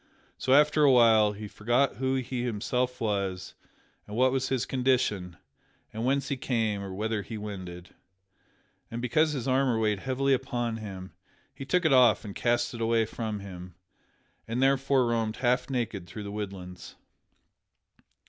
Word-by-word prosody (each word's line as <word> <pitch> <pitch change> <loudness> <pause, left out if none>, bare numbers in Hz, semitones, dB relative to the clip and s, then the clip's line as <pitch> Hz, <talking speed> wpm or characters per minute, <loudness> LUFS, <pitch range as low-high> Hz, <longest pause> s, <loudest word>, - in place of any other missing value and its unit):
So, 130 - +2
after 150 +1 +4
a 140 - +6
while, 110 -4 +5
he 105 +1 -7
forgot 120 +4 0
who 130 +1 0
he 130 -1 -3
himself 125 +2 -1
was, 100 -4 -2 0.5
and 105 - -7
what 130 +1 +4
was 130 0 -1
his 130 -3 0
condition, 120 -9 0 0.6
or 110 - -5
whence 135 +2 0
he 140 - -1
came 110 -6 -1
or 100 -1 -6
whither 110 +2 -2
he 110 +3 -7
wended. 95 -4 -8 1.0
And 115 - -5
because 150 +6 +2
his 130 -4 -4
armor 130 -2 +2
weighed 105 -2 +1
heavily 135 +3 0
upon 120 -3 -2
him, 95 -4 -8 0.4
he 135 0 -8
took 180 +4 +1
it 155 - +4
off 125 -3 +5
and 100 - -6
cast 120 +2 0
it 115 - -6
away 115 0 +2
from 110 -2 -5
him, 90 -2 -10 0.7
and 115 +2 -2
thereafter 135 -1 +3
roamed 115 -2 0
half 125 +1 0
naked 115 -8 -3
through 105 - -8
the 100 - -6
woodlands. 95 -3 -7
115 Hz, 160 wpm, -28 LUFS, 105-130 Hz, 1.0 s, a